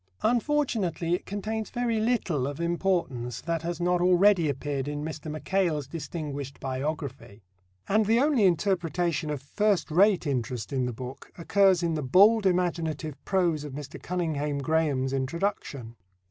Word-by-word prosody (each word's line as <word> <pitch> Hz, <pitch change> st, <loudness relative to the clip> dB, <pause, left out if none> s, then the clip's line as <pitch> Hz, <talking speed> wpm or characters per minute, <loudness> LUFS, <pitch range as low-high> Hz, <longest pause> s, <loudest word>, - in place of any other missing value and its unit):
Unfortunately, 225 Hz, -, +1 dB
it 180 Hz, -, -2 dB
contains 215 Hz, +2 st, -3 dB
very 240 Hz, -2 st, -1 dB
little 205 Hz, -, 0 dB
of 145 Hz, +1 st, -5 dB
importance 170 Hz, -, -1 dB
that 165 Hz, -1 st, -2 dB
has 170 Hz, 0 st, -4 dB
not 175 Hz, 0 st, +1 dB
already 180 Hz, -2 st, +4 dB
appeared 140 Hz, 0 st, -3 dB
in 145 Hz, 0 st, -3 dB
Mr. 155 Hz, 0 st, -6 dB
Mackail's 155 Hz, -1 st, 0 dB
distinguished 145 Hz, -2 st, -6 dB
biography; 135 Hz, -5 st, -5 dB, 0.4 s
and 215 Hz, +1 st, +2 dB
the 225 Hz, +2 st, +4 dB
only 275 Hz, -6 st, +3 dB
interpretation 175 Hz, -3 st, +1 dB
of 145 Hz, -3 st, -4 dB
first 195 Hz, +2 st, 0 dB
rate 190 Hz, +2 st, +4 dB
interest 125 Hz, -3 st, -2 dB
in 130 Hz, -2 st, 0 dB
the -, -, -2 dB
book 125 Hz, +3 st, -9 dB
occurs 185 Hz, +1 st, +3 dB
in 170 Hz, -1 st, +1 dB
the 155 Hz, -, -1 dB
bold 200 Hz, -, +5 dB
imaginative 165 Hz, -4 st, -1 dB
prose 175 Hz, -6 st, +1 dB
of 145 Hz, -3 st, -7 dB
Mr. 145 Hz, 0 st, -8 dB
Cunninghame 150 Hz, -5 st, -2 dB
Graham's 140 Hz, -4 st, +1 dB
introduction. 135 Hz, -, -3 dB
165 Hz, 145 wpm, -27 LUFS, 140-190 Hz, 0.4 s, bold